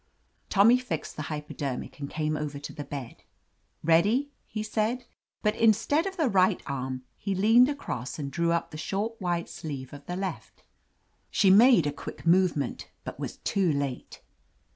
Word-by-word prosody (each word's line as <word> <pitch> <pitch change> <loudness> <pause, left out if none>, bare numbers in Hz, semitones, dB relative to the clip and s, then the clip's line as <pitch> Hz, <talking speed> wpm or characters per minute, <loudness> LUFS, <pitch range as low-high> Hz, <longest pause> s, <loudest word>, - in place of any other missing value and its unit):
Tommy 225 +5 +6
fixed 195 -12 -4
the - - -4
hypodermic 150 -4 -5
and 140 -1 -5
came 155 0 -1
over 150 -2 -4
to 145 - -7
the 145 - -6
bed. 140 -5 -7 0.6
"Ready!" 205 - +3 0.2
he 215 0 -4
said, 220 +3 -1 0.4
but 210 -1 +2
in 225 -1 +6
stead 290 - 0
of 385 0 -6
the 315 -5 +2
right 190 -3 +3
arm, 130 -2 -4 0.2
he 195 -1 -2
leaned 225 +7 +6
across 135 - -4
and 140 -3 -4
drew 170 +1 +1
up 170 0 -1
the 155 - -7
short 210 +6 -3
white 175 -2 -1
sleeve 140 -4 -7
of 145 0 -10
the 180 - -3
left 190 0 -5 0.7
She 195 -2 +4
made 225 - +7
a 145 - -1
quick 145 - -9
movement, 170 -7 +2
but - - -7
was - - -5
too 190 -4 +1
late. 140 -3 -3
175 Hz, 170 wpm, -28 LUFS, 145-215 Hz, 0.7 s, made